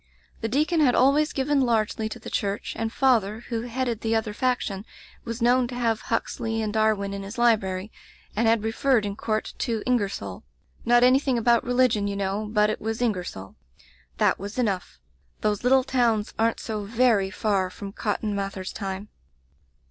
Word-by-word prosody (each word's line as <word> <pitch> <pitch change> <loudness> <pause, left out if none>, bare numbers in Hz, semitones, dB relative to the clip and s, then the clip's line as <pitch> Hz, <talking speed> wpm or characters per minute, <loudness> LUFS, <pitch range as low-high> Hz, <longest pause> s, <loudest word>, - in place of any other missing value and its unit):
The 225 - -2
deacon 305 +7 +1
had 260 -5 +4
always 290 +4 +4
given 275 +1 +1
largely 220 -2 0
to 230 - -6
the 225 - -9
church, 200 0 -2
and 225 0 -2
father, 230 -5 +2
who 230 -2 -1
headed 240 -1 -2
the 225 0 0
other 220 -1 -1
faction, 225 -5 -1 0.4
was 230 0 -4
known 245 +1 +4
to 245 - -7
have 230 -3 0
Huxley 225 -1 -1
and 215 -1 -2
Dar 220 0 +3
win 200 0 -4
in 200 - -4
his 195 +3 -8
library, 215 -4 +1 0.4
and 225 +2 +2
had 225 -1 +3
referred 230 0 +2
in 200 -1 -3
court 215 0 -2
to 225 -3 -1
IngersoU 200 - -1 0.2
— - - -23
^not 240 0 +5
anything 260 0 +4
about 235 0 +3
religion, 245 -4 +2
you 200 - -2
know, 200 +2 -2
but 210 -1 +3
it - - -5
was 220 +1 -3
IngersoU. 180 - -3 0.6
That - - +2
was 200 +4 -7
enough. 205 -7 -1 0.4
Those 210 0 0
little 260 +1 +4
towns 235 -5 +1
aren't 225 0 +2
so 215 -2 -4
very 220 -2 +2
far 190 -2 0
from 195 +2 -8
Cotton 210 +1 -2
Mather's 195 -1 -4
time. 195 0 -5
225 Hz, 180 wpm, -25 LUFS, 205-245 Hz, 0.6 s, ^not